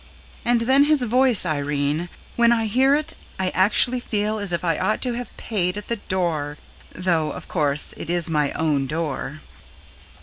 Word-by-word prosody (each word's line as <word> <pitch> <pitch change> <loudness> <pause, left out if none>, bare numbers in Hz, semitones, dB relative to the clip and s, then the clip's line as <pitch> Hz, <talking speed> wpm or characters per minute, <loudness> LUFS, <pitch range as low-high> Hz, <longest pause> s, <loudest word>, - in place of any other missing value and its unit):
And 240 -1 +2
then 265 +4 +4
his 300 -3 +4
voice 245 -2 +4
Irene, 145 +1 -1 0.3
when 235 0 +4
I 225 -1 +2
hear 260 +6 +3
it 305 +2 -1 0.3
I 185 -1 0
actually 220 +6 +3
feel 215 -2 -1
as 200 -3 -1
if 170 - -2
I 165 -3 0
ought 215 - 0
to 250 -2 -1
have 240 -1 -7
PAID 185 -4 -2
AT 210 - -8
THE 235 - -1
DOOR, 165 -7 -2 0.3
though, 165 -4 0
of - - -9
course, 150 -3 +1
it - - -8
is 175 -1 +1
my 150 -3 0
own 145 -4 0
door. 155 -1 -4
185 Hz, 175 wpm, -22 LUFS, 155-235 Hz, 0.3 s, then